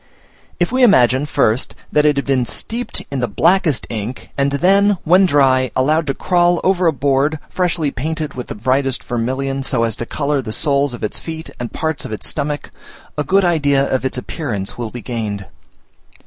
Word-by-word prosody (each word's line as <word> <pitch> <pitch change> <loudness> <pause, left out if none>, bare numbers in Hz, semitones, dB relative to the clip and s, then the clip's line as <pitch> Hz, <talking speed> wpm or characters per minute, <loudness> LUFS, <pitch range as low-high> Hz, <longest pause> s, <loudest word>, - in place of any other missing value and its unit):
If 175 +3 +1
we 260 +1 +1
imagine, 135 - +5
first, 115 -3 +1 0.2
that 150 0 +3
it 150 - +3
had 140 - -1
been 130 -3 +1
steeped 230 - -2
in 140 - -2
the 125 - 0
blackest 155 - +2
ink, 115 +2 -6
and 140 0 0
then, 195 +7 +3
when 185 +4 +5
dry, 130 -4 +3
allowed 155 +4 +2
to 135 - -1
crawl 175 -1 +2
over 185 -2 +2
a - - +5
board, 140 +2 +1
freshly 170 -5 0
painted 155 +4 -4
with 125 -1 -6
the - - -6
brightest 130 +4 0
vermilion, 130 +3 -2
so 130 -3 0
as 115 -2 -1
to 120 - -5
colour 145 -1 -1
the 110 -4 -6
soles 140 -2 +1
of - - -11
its 105 - -2
feet 160 0 -7
and 120 -1 -5
parts 160 -2 -3
of - - -7
its 110 - -5
stomach, 145 0 -3 0.4
a 150 - -1
good 195 +6 +3
idea 145 -5 +2
of 130 - 0
its 130 -1 -2
appearance 115 - -4
will 120 -2 -4
be 120 0 -8
gained. 105 -4 -4
140 Hz, 190 wpm, -18 LUFS, 125-160 Hz, 0.4 s, imagine